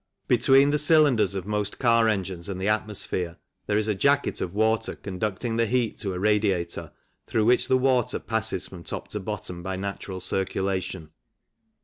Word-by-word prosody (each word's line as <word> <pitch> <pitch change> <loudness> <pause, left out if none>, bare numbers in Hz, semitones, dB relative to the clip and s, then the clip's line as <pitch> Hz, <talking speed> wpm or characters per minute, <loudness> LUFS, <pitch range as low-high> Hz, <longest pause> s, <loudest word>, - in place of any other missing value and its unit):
Between 135 +3 +5
the 150 - +2
cylinders 145 - +4
of 95 -2 -4
most 105 0 -2
car 115 -2 +4
engines 95 -4 -2
and 95 -2 -4
the 95 - -1
atmosphere 105 -5 -1 0.3
there 105 - +1
is 110 0 +1
a 105 - +2
jacket 140 +8 +1
of 90 - -2
water 110 +1 +1
conducting 105 +4 -3
the 115 -1 +2
heat 120 -1 0
to 100 -4 -3
a - - -4
radiator, 100 -4 0 0.4
through 110 -1 +1
which 125 +2 +4
the 130 - +4
water 130 -2 +2
passes 110 -4 -2
from 90 -3 -11
top - - -6
to 105 - -4
bottom 95 -3 -5
by 95 +2 -4
natural 95 0 -5
circulation. 95 -4 -2
105 Hz, 170 wpm, -25 LUFS, 95-115 Hz, 0.4 s, Between